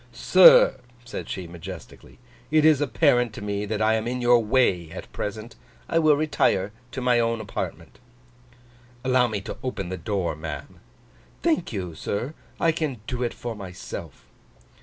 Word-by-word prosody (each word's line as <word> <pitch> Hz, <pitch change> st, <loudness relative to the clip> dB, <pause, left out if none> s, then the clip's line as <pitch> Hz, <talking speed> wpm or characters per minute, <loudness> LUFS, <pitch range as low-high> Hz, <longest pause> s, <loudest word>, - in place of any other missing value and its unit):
'Sir,' -, -, +7 dB, 0.3 s
said 120 Hz, -, -7 dB
she, 95 Hz, -, -4 dB
majestically. 85 Hz, +2 st, -10 dB, 0.3 s
'It 155 Hz, 0 st, +3 dB
is 155 Hz, -3 st, +5 dB
apparent 125 Hz, -5 st, +2 dB
to -, -, -7 dB
me 105 Hz, 0 st, -3 dB
that 110 Hz, 0 st, -1 dB
I 110 Hz, +1 st, +3 dB
am 110 Hz, +1 st, -1 dB
in 125 Hz, +1 st, -2 dB
your 120 Hz, -1 st, +4 dB
way 105 Hz, -8 st, +2 dB
at -, -, -10 dB
present. 110 Hz, +3 st, -5 dB, 0.3 s
I 165 Hz, -, +2 dB
will 155 Hz, -2 st, +5 dB
retire 105 Hz, -10 st, +1 dB, 0.2 s
to 130 Hz, -, -4 dB
my 125 Hz, -1 st, +3 dB
own 115 Hz, 0 st, 0 dB
apartment.' 105 Hz, -2 st, -6 dB, 1.0 s
'Allow 130 Hz, -1 st, +3 dB
me 105 Hz, -3 st, -3 dB
to -, -, -7 dB
open 100 Hz, -8 st, -4 dB
the 95 Hz, -, -4 dB
door, 90 Hz, -1 st, -2 dB
ma'am.' 75 Hz, -2 st, -7 dB, 0.6 s
'Thank 325 Hz, -, +1 dB
you, 90 Hz, -6 st, -4 dB
sir; 105 Hz, -, -4 dB, 0.3 s
I 165 Hz, -, +3 dB
can 155 Hz, -6 st, -3 dB
do 125 Hz, +1 st, -4 dB
it 120 Hz, -2 st, -2 dB
for 120 Hz, -1 st, -5 dB
myself. 90 Hz, -5 st, -8 dB
115 Hz, 160 wpm, -25 LUFS, 95-130 Hz, 1.0 s, Sir